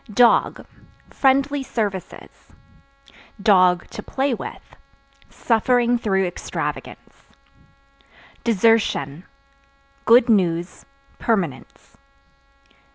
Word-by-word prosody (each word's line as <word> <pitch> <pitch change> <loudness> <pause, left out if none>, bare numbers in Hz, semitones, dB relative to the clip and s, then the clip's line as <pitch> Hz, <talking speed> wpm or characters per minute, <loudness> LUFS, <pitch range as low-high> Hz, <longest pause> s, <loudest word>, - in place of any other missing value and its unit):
Dog 245 -1 +3 0.5
Friendly 275 +1 +1
services; 210 -7 -6 0.9
(to 185 -4 +2
play 270 0 -1
with) - - -9 0.5
suffering 240 +1 +1
through 195 -4 0
extravagance. 180 - -7 1.2
Desertion 200 - +1 0.8
Good 235 +1 +5
news, 175 -5 0 0.3
permanence. 180 - -3
225 Hz, 60 wpm, -21 LUFS, 185-245 Hz, 1.2 s, Good